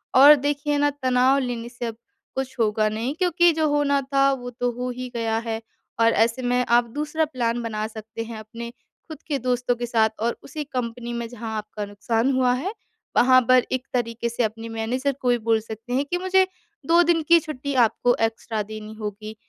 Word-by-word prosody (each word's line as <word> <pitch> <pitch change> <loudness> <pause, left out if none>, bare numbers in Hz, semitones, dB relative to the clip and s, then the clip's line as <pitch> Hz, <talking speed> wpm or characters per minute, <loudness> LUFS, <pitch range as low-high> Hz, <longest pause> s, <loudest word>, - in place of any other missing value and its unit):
और 285 +3 +10
देखिए 290 +1 -1
ना 290 0 +3
तनाव 255 +1 +4
लेने 240 -3 -3
से 240 0 -6
अब 230 - -4 0.4
कुछ 265 0 -3
होगा 215 -1 +2
नहीं 225 +5 -2
क्योंकि 345 0 +3
जो 315 0 +1
होना 290 -1 +2
था 275 0 +4
वो 245 -2 -5
तो 245 0 -2
हो 250 +1 -4
ही 250 +1 -6
गया 225 -1 0
है। 225 0 -2 0.4
और 230 0 +5
ऐसे 230 +3 +2
में 245 0 +1
आप 240 0 +5
दूसरा 305 +2 0
प्लान 240 -5 -2
बना 215 -2 -3
सकते 220 +1 -7
हैं, 225 -1 -8
अपने 230 +2 -8 0.4
खुद 315 -2 -9
के 290 -3 -1
दोस्तों 250 0 0
के 240 0 -3
साथ 225 -2 +2
और 235 +2 -1
उसी 300 +1 -5
कंपनी 240 -2 -4
में 235 0 -3
जहाँ 225 -2 -6
आपका 210 -1 -5
नुकसान 225 +5 0
हुआ 255 -1 +3
है, 330 - -3 0.4
वहाँ 255 +1 +6
पर 255 -1 +6
एक 255 +1 -2
तरीके 235 -1 -1
से 235 +1 -1
अपने 225 +1 -3
मैनेजर 245 +5 -1
को 250 - +1
भी 245 - +4
बोल 225 - +5
सकते 225 +2 -7
हैं 270 +3 +1
कि 355 - +1
मुझे 375 0 +3 0.4
2 340 +1 +6
दिन 335 -1 +2
की 340 0 +8
छुट्टी 280 -3 -5
आपको 245 +2 +1
एक्स्ट्रा 225 -1 -5
देनी 215 +1 -8
होगी 215 +1 -6
245 Hz, 205 wpm, -24 LUFS, 225-275 Hz, 0.4 s, और